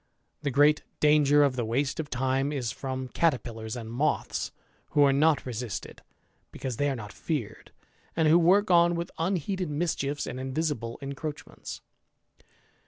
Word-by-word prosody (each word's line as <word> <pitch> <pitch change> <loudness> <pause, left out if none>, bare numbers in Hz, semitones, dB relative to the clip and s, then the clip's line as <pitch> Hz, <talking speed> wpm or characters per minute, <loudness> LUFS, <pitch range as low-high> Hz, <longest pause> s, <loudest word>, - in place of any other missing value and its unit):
The 145 - -1
great 145 +3 +4 0.2
danger 145 -1 +5
of 140 -3 +2
the 120 - -1
waste 130 +7 -1
of 150 -2 -3
time 135 +2 0
Ib 140 -3 -2
firom 130 +2 -4
caterpillars 120 -8 -1
and 115 -2 -6
moths, 145 +5 -1 0.4
who 145 - +5
are 140 -1 +5
not 150 +2 +3
resisted, 120 -3 -5 0.5
because 130 -4 -5
they 145 0 +1
are 135 - -1
not 105 -4 -8
feared, 120 -10 -4 0.4
and 160 -1 +3
who 165 +3 +6
work 185 +4 +4
on 170 0 +5
with 170 0 -4
imheeded 180 +1 -1
mischiefs 145 -2 -1
and 130 - -5
invisible 130 -3 -2
encroachments. 140 +2 -6
145 Hz, 150 wpm, -28 LUFS, 130-155 Hz, 0.5 s, who